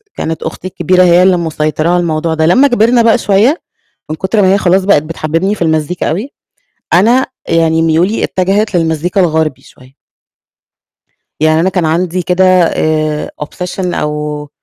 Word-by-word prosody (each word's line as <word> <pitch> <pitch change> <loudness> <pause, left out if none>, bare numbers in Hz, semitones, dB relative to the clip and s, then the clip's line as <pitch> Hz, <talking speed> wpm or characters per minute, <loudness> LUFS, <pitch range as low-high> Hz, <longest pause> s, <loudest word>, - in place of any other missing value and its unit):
كانت 160 0 -4
أختي 160 +3 -6
الكبيرة 185 0 +1
هي 175 0 +4
اللي 185 -1 +3
مسيطرة 155 -1 -2
على 180 - +2
الموضوع 165 -1 -1
ده، 160 0 0
لمّا 255 - +4
كبرنا 240 -1 +2
بقى 230 0 +3
شوية، 225 - +1 0.5
من 155 - -3
كتر 190 +6 0
ما 190 0 +3
هي - - +2
خلاص، 185 0 +1
بقت 190 -7 +3
بتحبِّبني 165 +5 -2
في 185 - -5
المزيكا 160 +1 -1
أوي، 205 - -4 0.6
أنا 235 +8 +3 0.2
يعني 165 -1 +1
ميولي 165 +6 +1
اتجهت 195 +3 -1
للمزيكا 165 +3 0
الغربي 160 -4 -1
شوية. 130 +1 -20 1.5
يعني 155 0 +2
أنا 180 - +1
كان 180 -2 -1
عندي 175 +3 -1
كده 180 +2 +1 0.2
آآ 155 -2 -1
obsession 180 +3 -5
أو 150 0 -4
175 Hz, 155 wpm, -12 LUFS, 155-190 Hz, 1.5 s, هي